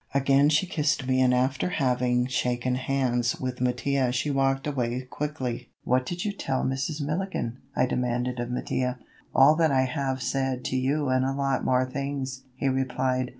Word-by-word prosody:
Again 140 +1 +4
she 155 +4 +3
kissed 150 -5 0
me 130 0 +2
and 125 -1 +4
after 130 +6 +1
having 125 -4 +1
shaken 125 -1 0
hands 125 -2 0
with 125 -1 -4
Mattia 125 +1 +1
she 130 +4 -1
walked 135 0 +1
away 130 -3 -1
quickly. 130 -2 -4
"What 125 +1 +1
did 175 +2 -3
you 210 - 0
tell 135 -9 -2
Mrs. 135 +4 -2
Milligan?" 150 -5 -2 0.2
I - - +3
demanded 125 0 -1
of 120 0 -3
Mattia. 125 0 -1 0.4
"All 140 +4 +7
that 165 -1 +4
I 130 -1 +4
have 130 0 -1
said 130 0 -1
to - - -1
you 135 +2 +1
and 130 0 +2
a 135 +1 0
lot 135 -1 0
more 130 0 +2
things," 135 -1 -4
he 135 - -1
replied. 130 -1 0
130 Hz, 175 wpm, -26 LUFS, 125-140 Hz, 0.4 s, All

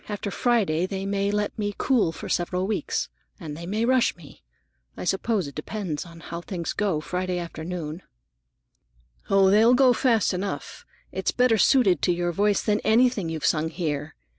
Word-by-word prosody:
After 205 -1 -4
Friday 195 -10 +1
they 195 0 -4
may 200 0 0
let 210 +2 -2
me 205 -1 -2
cool 245 -11 +2
for - - -8
several 180 +1 -1
weeks, 215 +2 -2 0.3
and 155 -5 -7
they 170 +2 -8
may 215 +4 0
rush 255 0 +3
me. 160 -5 -15 0.6
I - - -5
suppose 195 0 0
it 140 - -9
depends 160 0 -4
somewhat 165 -1 -11
on - - -10
how 170 0 -4
things 175 -2 -4
go 195 -7 0
Friday 180 +2 -2
afternoon." 170 -1 -5 1.3
"Oh, 195 -1 +5
they'll 225 +4 +6
go 255 -1 +5
fast 230 -6 +2
enough! 195 +2 -5 0.3
That's - - -1
better 245 -3 +3
suited 205 -5 +4
to 180 - +2
your 175 0 0
voice 205 +3 +1
than 210 -1 +1
anything 220 -5 +2
you've 160 -2 -3
sung 160 0 +1
here. 155 -3 -3
190 Hz, 175 wpm, -25 LUFS, 170-215 Hz, 1.3 s, they'll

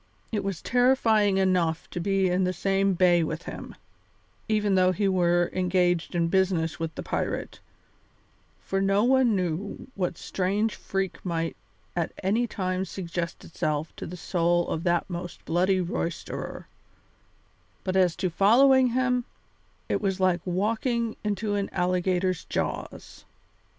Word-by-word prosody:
It 210 -3 -1
was 195 -4 -4
terrifying 230 -5 +3
enough 180 -4 +1
to - - -4
be 195 +1 +1
in 180 +1 +1
the 185 0 0
same 195 +1 +1
bay 175 -1 +4
with 160 +2 -4
him, - - -8 0.7
even 210 -2 +2
though 185 -1 +4
he 195 +2 0
were 175 -2 +2
engaged 180 -2 +1
in 170 -1 +2
business 175 -3 +1
with 165 -1 -4
the - - -5
pirate, - - -3 1.0
for 195 0 -1
no 195 +1 +3
one 255 -3 +4
knew 185 +2 -3
what 180 -3 -2
strange 200 +4 -1
freak 195 -1 -3
might 165 -2 -2 0.4
at 170 -2 -1
any 220 +6 +1
time 185 -3 -2
suggest 175 -2 -5
itself 155 -1 -2
to - - -6
the 180 - -7
soul 175 0 +1
of 160 - -2
that 175 0 +1
most 175 -1 -7
bloody 185 +3 +2
roisterer; 170 -1 -4 1.2
but 185 -1 -2
as 180 -3 +3
to 185 - -1
following 255 +8 +5
him, 250 0 +1 0.6
it - - 0
was 195 -2 -1
like 185 -2 +2
walking 225 +5 0
into 210 0 -1
an 200 -1 -1
alligator's 180 0 0
jaws. - - -4
185 Hz, 140 wpm, -26 LUFS, 175-200 Hz, 1.2 s, following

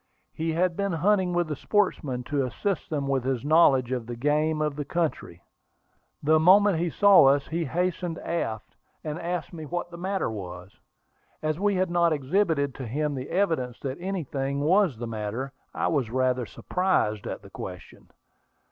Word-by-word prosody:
He 160 0 -2
had 175 +1 +1
been 200 -1 -1
hunting 185 +2 +2
with 175 -1 +1
the 150 - -3
sportsmen, 150 -10 0
to 140 +1 -1
assist 175 - -2
them 145 -3 -2
with 135 -2 0
his 130 0 -2
knowledge 140 -5 +4
of 125 -3 -2
the 120 - -5
game 150 +5 +1
of 150 -2 -1
the 145 - -3
country. 145 - -3 0.8
The 155 +2 +4
moment 190 +2 +5
he 175 +1 0
saw 200 -2 +6
us 140 +1 +4
he 165 +1 -1
hastened 175 +2 -2
aft, 115 -11 -4 0.3
and 155 +1 -4
asked 175 +1 -3
me 160 -3 -7
what 175 +2 -4
the 170 - -9
matter 190 - -1
was. 90 -3 -8 0.7
As 155 +1 -1
we 205 0 +2
had 185 -1 0
not 170 -1 +3
exhibited 145 -1 +1
to 130 -2 -7
him 150 +5 -1
the 130 0 -5
evidences 160 -10 0
that 135 +1 -4
anything 140 -7 -2
was 175 - +3
the 120 - -5
matter, 115 +4 -4 0.2
I - - -1
was 135 -8 0
rather 130 -1 0
surprised 145 - 0
at - - -6
the - - -14
question. - - -9
155 Hz, 175 wpm, -26 LUFS, 130-175 Hz, 0.8 s, saw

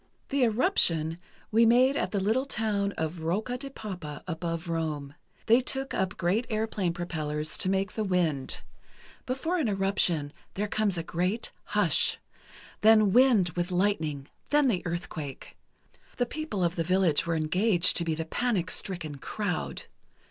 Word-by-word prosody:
The 280 0 0
"eruption," 175 - +2 0.3
we 225 +2 +5
made 250 +4 +5
at - - 0
the 200 - -1
little 225 +8 +1
town 210 -5 0
of 160 +1 -4
Rocca 205 +10 -1
di 275 - -6
Papa, 180 - -7
above 165 0 -3
Rome. 155 -4 -3 0.3
They 230 +3 +5
took 270 +1 -2
up 190 0 -1
great 190 +7 0
airplane 215 -4 -1
propellers 155 -3 -3
to 185 - +2
make 195 0 0
the 220 - -2
wind. 170 -8 -1 0.7
Before 320 +8 -1
an 290 - +1
eruption, 195 -7 +1 0.2
there 210 +2 -1
comes 205 -3 0
a 165 - -2
great 180 +7 -2
hush—then 215 -2 +2
wind 240 -7 +5
with 175 +2 -2
lightning, 165 -7 0 0.2
then 295 -1 +4
the 185 -7 0
earthquake. 165 -5 -6 0.6
The 245 - +2
people 245 - -3
of 170 +1 0
the 165 - +1
village 180 -3 +2
were 170 - +1
engaged 180 +4 +2
to 170 - +3
be 165 -1 -1
the 160 +1 -3
panic 190 -2 -1
stricken 160 -7 -3
crowd. 190 +2 -3
185 Hz, 150 wpm, -28 LUFS, 165-220 Hz, 0.7 s, we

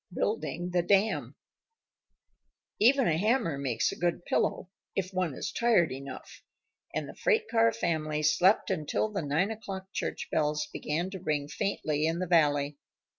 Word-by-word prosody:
BUILDING 175 -3 -2
THE 175 0 +2
DAM 200 +4 +1 1.4
Even 260 +4 +5
a 160 -1 +2
hammer 215 - +1
makes 125 -5 0
a - - -6
good 175 0 -1
pillow 185 - 0 0.2
if 190 -1 -2
one 180 -6 -1
is - - -4
tired 220 - +3
enough, 135 +1 -8 0.5
and - - -3
the - - -9
freight 445 -2 +1
car 230 0 +4
family 155 -7 -1
slept 180 +7 +3
until 160 +4 -1
the 200 - -2
nine 160 +8 0
o'clock 195 -3 -7
church - - -3
bells 150 0 +1
began 170 +5 -2
to 190 - -6
ring 150 -5 -1
faintly 155 -2 -1
in 165 +1 0
the 185 - -1
valley. 145 -4 +2
175 Hz, 155 wpm, -29 LUFS, 150-200 Hz, 1.4 s, Even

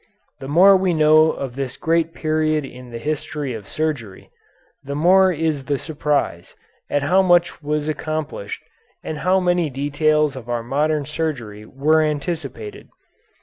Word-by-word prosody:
The 135 - -7
more 185 +7 +6
we 185 -2 +1
know 155 0 +5
of 135 -5 -4
this 135 -2 -4
great 165 0 +1
period 155 -2 0
in 125 -1 -11
the 120 - -7
history 145 0 -3
of 110 -3 -8
surgery, 145 -11 -4 0.5
the 140 +1 -5
more 185 +5 +5
is 155 -4 -2
the 140 0 0
surprise 145 - -2 0.3
at 145 - 0
how 180 +7 +4
much 175 -3 +2
was 150 0 -2
accomplished, 155 -8 -4 0.4
and 155 - -5
how 185 +3 +2
many 175 -3 +1
details 145 +2 +1
of 120 -2 -9
our 120 -1 -2
modern 145 +4 0
surgery 125 -9 -4
were 155 +4 +2
anticipated. 145 - -4
150 Hz, 150 wpm, -21 LUFS, 135-160 Hz, 0.5 s, more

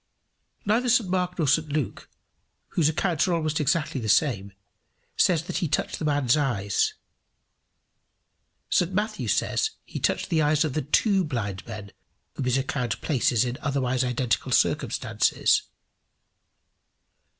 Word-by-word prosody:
Neither 230 +5 +2
St 230 -6 +3
Mark 180 -1 -1
nor 160 -4 0
St 150 +2 +2
Luke, 145 -7 -3 0.6
whose 155 -3 +2
accounts 165 +1 0
are 175 - +1
almost 155 -1 -1
exactly 150 -2 0
the 110 - -3
same, 100 -6 +2 0.6
says 165 -4 +3
that 175 - -4
he 175 -2 0
touched 145 - -1
the 155 - -3
man's 145 -4 +2
eyes. 115 -10 0 1.8
St 180 +1 +2
Matthew 215 +2 -2
says 435 - +1 0.2
he - - -6
touched - - 0
the 160 -2 +3
eyes 150 +1 +2
of 150 - -3
the 155 - 0
two 190 - +2
blind 105 - -4
men 105 -3 -8 0.4
whom 135 - -4
his 125 +1 +2
account 125 -3 -2
places 125 -4 +1
in 125 +1 -4
otherwise 130 -2 0
identical 125 -1 -1
circumstances. - - +2
150 Hz, 140 wpm, -25 LUFS, 125-170 Hz, 1.8 s, St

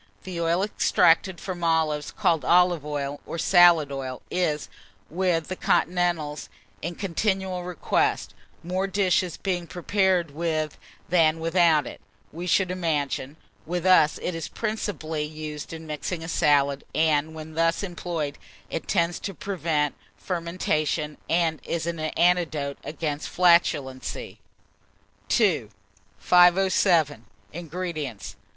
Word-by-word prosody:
The 180 -3 -5
oil 170 +3 +1
extracted 190 -3 +2
from 180 -3 -6
olives, 160 -3 +1
called 160 -5 +1
olive 175 +1 +4
oil, 145 -1 -4
or - - -5
salad 170 -3 +5
oil, 130 -2 -5
is, 155 - 0 0.4
with 175 -2 0
the 185 - -4
continentals, 175 -4 0 0.3
in 170 +2 -4
continual 190 0 -1
request, 180 -3 -1 0.3
more 185 +3 -1
dishes 185 -3 +1
being 180 -3 -2
prepared 180 -2 +1
with 155 -1 -2 0.3
than 165 -2 +3
without 165 -2 +3
it, - - -9 0.3
we 175 +3 -6
should 185 0 +2
imagine. 150 -5 -2 0.3
With 175 +1 -2
us, 180 -5 +5
it 180 - -2
is 165 -1 -4
principally 180 -9 -3
used 150 -1 -7
in 160 0 -8
mixing 160 +2 -4
a - - -6
salad, 145 -4 +2
and 155 0 +1
when 155 0 -8
thus 165 +4 +1
employed, 170 -5 -4 0.3
it 165 - -4
tends 170 -2 +1
to 195 - -5
prevent 160 -7 -1 0.2
fermentation, 165 -4 -2
and 165 -2 +1
is 165 -1 -3
an 170 -1 -3
antidote 155 -3 +1
against 150 -1 -4
flatulency. 160 -7 +1 1.0
II. 170 - +2 0.5
507. 175 - +4 0.3
INGREDIENTS. 165 - -5
165 Hz, 120 wpm, -25 LUFS, 150-180 Hz, 1.0 s, salad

